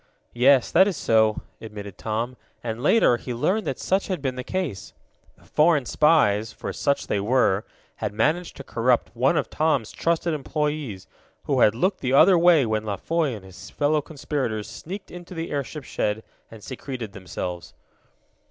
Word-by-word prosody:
"Yes, 130 +2 +4
that 190 +3 +6
is 190 -7 -2
so," 110 -1 +2 0.2
admitted 105 -3 -8
Tom, 115 +3 -3 0.3
and, 115 0 -4
later, 150 - +4
he 120 +1 -6
learned 195 - 0
that 135 - -2
such 190 +1 0
had 185 -2 -2
been 135 -2 -2
the 125 - -5
case. 160 - -4 0.4
The - - -23
foreign 150 -3 +3
spies, 115 -7 +3
for - - -6
such 140 - 0
they 100 - -1
were, 105 -2 +2 0.3
had - - -3
managed 155 +11 0
to 140 - -8
corrupt 120 -1 +1
one 135 +7 +2
of - - -1
Tom's 145 -8 +1
trusted 170 0 0
employees, 150 -7 -3 0.4
who - - 0
had 105 - +5
looked 185 - 0
the 130 0 -1
other 175 +7 +7
way 170 -5 +5
when 110 -1 -1
La 105 -2 -2
Foy 160 0 -1
and 100 -3 -11
his 95 +2 -11
fellow 150 +5 +1
conspirators 135 -8 -3
sneaked 190 +5 -8
into 175 +1 -10
the 165 0 -4
airship 145 +1 -4
shed 105 -3 -2 0.3
and 110 -2 -13
secreted 125 -4 -6
themselves. 90 -2 -6
130 Hz, 170 wpm, -24 LUFS, 110-160 Hz, 0.4 s, other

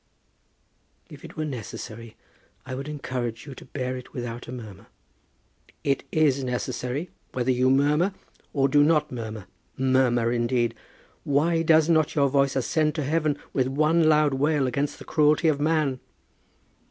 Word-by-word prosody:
"If - - -12
it - - -11
were 155 - -1
necessary, 115 -3 -7 0.5
I 130 - -6
would 135 +3 -5
encourage 130 -6 -4
you 140 - -8
to - - -12
bear 130 -2 -4
it 125 -1 -10
without 120 -1 -6
a - - -7
murmur." 110 -7 -9 1.0
"It 140 -1 0
is 140 -4 +2
necessary, 125 +4 -3 0.2
whether 130 0 0
you 130 +1 +2
murmur, 145 +7 +3 0.4
or 135 -2 +2
do 145 +2 +4
not 150 -1 +2
murmur. 110 -4 -6 0.3
Murmur, 130 -3 +2
indeed! 120 -1 +1 0.5
Why 165 +4 +2
does 160 -1 +4
not 160 -2 +2
your 140 -2 +3
voice 140 0 +2
ascend 150 +4 +1
to 155 - -1
heaven 150 0 0 0.2
with 130 -2 +1
one 155 +4 +3
loud 150 -2 +4
wail 145 +1 +1
against 140 +3 -1
the - - -11
cruelty 155 +1 +3
of 145 -2 +1
man?" 150 -4 +1
140 Hz, 155 wpm, -25 LUFS, 125-150 Hz, 1.0 s, do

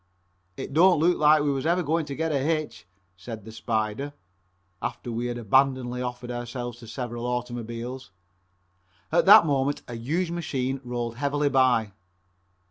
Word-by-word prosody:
"It 135 - -6
don't 175 +2 +5
look 175 +3 +3
like 150 0 +5
we 145 - +1
was 135 +2 -2
ever 175 +2 +2
going 160 0 0
to 140 - -5
get 160 +1 -1
a 140 - +1
hitch," 155 - -2 0.3
said 110 +2 -9
the 110 - -9
"Spider," 110 +5 -2 0.7
after 120 0 -4
we 120 +1 -2
had 120 0 -3
abandonedly 125 +1 +2
offered 125 0 -5
ourselves 120 0 -5
to 115 - -12
several 120 0 -5
automobiles. 120 +1 -4 1.0
At 170 +3 +3
that 195 - +10
moment 140 -1 0
a 120 - -7
huge 160 +10 -2
machine 135 -6 -2
rolled 120 -1 -4
heavily 145 +1 +1
by. 125 -6 +3
130 Hz, 155 wpm, -26 LUFS, 120-145 Hz, 1.0 s, that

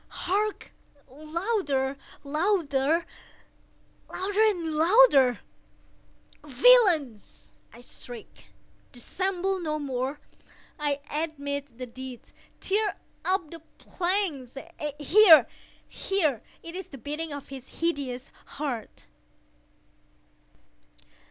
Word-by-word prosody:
—hark! 415 +3 -1 0.4
louder! 305 - -2 0.3
louder! 310 -1 +1 1.1
louder! 410 +2 +2
louder! 315 - +5 1.0
"Villains!" 310 - +3 0.2
I 235 - -14
shrieked, 245 -1 -11 0.5
"dissemble 375 +8 -2
no 305 -3 -2
more! 270 -1 -3 0.6
I 290 -1 -1
admit 285 -4 -4
the 255 - -5
deed!—tear 260 - -4 0.3
up 370 -4 0
the 335 - -9 0.2
planks!—here, 320 - +3 0.4
here!—It 335 - -3
is 380 - -6
the 275 - -11
beating 300 +6 -4
of 285 -1 -8
his 270 -2 -9
hideous 280 -6 -2 0.3
heart!" 270 -7 -5
305 Hz, 75 wpm, -27 LUFS, 270-370 Hz, 1.1 s, louder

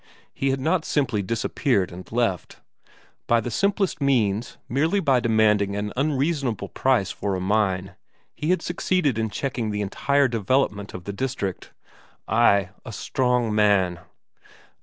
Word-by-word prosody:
He 135 - -1
had 135 0 0
not 160 +5 +1
simply 125 -10 0
disappeared 115 -1 0
and 90 +1 -10
left. 115 -6 -1 0.7
By 120 - +4
the 120 +2 -4
simplest 195 - 0
means, 115 -5 +1
merely 160 +10 +1
by 135 -9 +3
demanding 110 -4 +2
an 105 0 -3
unreasonable 135 - -1
price 125 -8 +1
for 100 -2 -2
a - - -2
mine, 95 -1 0 0.4
he 150 - -3
had 185 - +2
succeeded 175 - 0
in 110 0 0
checking 120 -1 -3
the 105 0 -2
entire 140 +8 +1
development 110 -3 0
of 90 - -7
the 100 - -5
district. 100 -5 -4 0.6
Ay, 100 -4 +3
a - - -8
strong 125 0 0
man! 100 -5 +3
115 Hz, 140 wpm, -24 LUFS, 100-135 Hz, 0.7 s, By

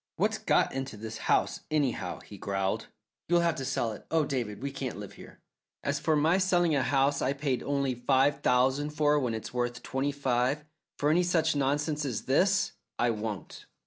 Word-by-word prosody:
"What's - - 0
got - - +2
into 135 -4 -4
this 110 +1 -7
house, - - +2
anyhow?" 145 -5 -1
he - - -12
growled. 95 -1 -1 0.4
"You'll 175 0 +4
have 170 -1 +2
to 135 - -3
sell 130 -4 0
it. 105 - -10
Oh, 160 -2 +2
David, 125 -5 -3
we 140 - -2
can't 135 -5 -4
live 100 -1 -8
here." - - -14 0.4
"As - - 0
for 160 -1 +2
my 160 +5 +3
selling 175 -3 +3
a 140 - +3
house 140 +2 +2
I 135 - +1
paid 140 -3 -1
only 140 -2 0
five 135 +3 +2
thousand 130 +4 +2
for 150 0 +3
when 120 -5 -1
it's 110 - -6
worth 120 -1 -2
twenty 135 +2 -1
five, 135 +1 0 0.3
for 145 +1 +2
any 175 +3 +4
such 165 -3 +2
nonsense 145 +2 0
as 125 -7 -3
this, 190 +9 +2 0.3
I 120 0 +2
won't!" 105 -2 -5
140 Hz, 190 wpm, -29 LUFS, 125-150 Hz, 0.4 s, You'll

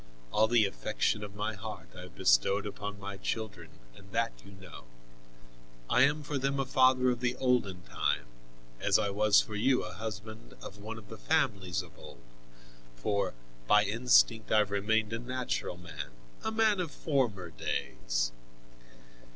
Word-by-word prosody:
All 110 +1 +4
the 115 -2 +4
affection 100 - -1
of 100 -1 -8
my 105 +1 -2
heart 110 +1 -8
I 90 - -8
have 90 -1 -11
bestowed 80 +13 +3
upon 105 0 -5
my 100 0 -6
children, 95 -5 -4 0.3
and 95 +8 -16
that 115 0 +1
you 100 - -13
know. 95 -9 -12 1.1
I 125 - +5
am 145 +3 +3
for 145 -1 -2
them 135 +1 0
a 135 - +1
father 130 -1 +4
of 120 - -2
the 125 0 0
olden 120 -9 +1
time, - - -1 0.5
as - - +4
I 100 - 0
was 105 +1 +5
for 110 - -8
you 125 +5 +2
a 90 - -6
husband 110 - -7
of 95 +11 -10
one 110 +2 -6
of 105 -2 -12
the 110 - -9
families 100 - 0
of 85 - -16
old, - - -12 0.7
for 95 +9 -1 0.3
by 105 +7 +6
instinct 115 0 +3
I - - +5
have 105 -2 +3
remained 105 +2 +1
a 115 - -2
natural 125 -6 -3
man, 80 -6 -7 0.3
a 220 - -1
man 220 -2 +3
of 175 -3 -1
former 120 - -1
days. - - -2
105 Hz, 165 wpm, -31 LUFS, 95-125 Hz, 1.1 s, by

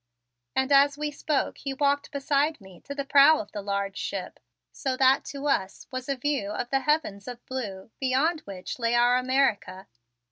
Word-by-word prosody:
And 265 +1 +1
as 280 +1 +5
we 300 0 -2
spoke 295 0 -2
he 275 -1 -4
walked 285 +1 +1
beside 285 +1 0
me 190 -4 -15
to 280 - -6
the 280 -1 -3
prow 285 +3 +7
of 205 - -7
the 205 - -5
large 200 0 -3
ship - - -5 0.3
so 265 -2 -3
that 265 +1 +4
to 280 0 -6
us 190 -9 -1
was 255 +1 -5
a 275 - +1
view 270 -6 -1
of 240 +3 -4
the 270 - +3
heavens 270 -9 -1
of 245 -1 -8
blue 215 -6 -6
beyond 275 +6 +1
which 190 +3 -7
lay 230 0 +1
our 240 +1 +4
America. 255 -8 0
265 Hz, 185 wpm, -26 LUFS, 210-280 Hz, 0.3 s, prow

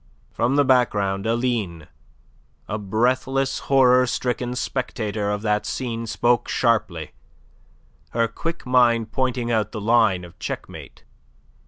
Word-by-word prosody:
From 125 +4 0
the 145 0 +4
background 105 -6 +2
Aline, 115 -9 -1 0.8
a 105 - -3
breathless, 130 +6 0
horror 130 -2 +5
stricken 125 0 -2
spectator 110 -5 -2
of 105 +1 -2
that 105 -1 +1
scene, 115 +1 -4
spoke 120 +3 +1
sharply, 100 -10 0 1.0
her 115 0 +1
quick 165 +6 -5
mind 120 -3 +3
pointing 125 -2 -1
out 110 -2 0
the - - -4
line 105 -4 +3
of 85 - -16
checkmate. - - -7
115 Hz, 120 wpm, -23 LUFS, 105-125 Hz, 1.0 s, horror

